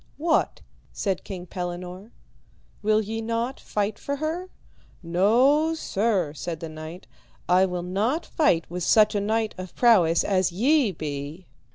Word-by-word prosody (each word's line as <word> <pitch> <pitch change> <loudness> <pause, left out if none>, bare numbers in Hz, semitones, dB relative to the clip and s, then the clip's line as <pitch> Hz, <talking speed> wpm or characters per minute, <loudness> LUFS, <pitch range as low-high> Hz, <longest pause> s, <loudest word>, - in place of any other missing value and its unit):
What, 320 +2 +1 0.3
said 195 -3 -2
King 180 -3 -7
Pellinore, 180 +2 -6 0.7
will 215 +1 +3
ye 220 +1 -4
not 230 +3 -2
fight 205 0 -2
for 280 - -3
her? 320 +5 -3 0.5
No, 250 - +3
sir, 200 - 0
said 165 +1 -5
the 165 - -6
knight, 155 +3 -9 0.4
I 185 +2 +4
will 180 -1 -4
not 215 - -1
fight 175 - +2
with 180 +1 -5
such 215 +3 +5
a 205 - 0
knight 220 +1 0
of 185 -1 -8
prowess 185 -9 +4
as 185 -2 +1
ye 250 - +3
be. 150 +1 -6
200 Hz, 145 wpm, -25 LUFS, 175-230 Hz, 0.7 s, such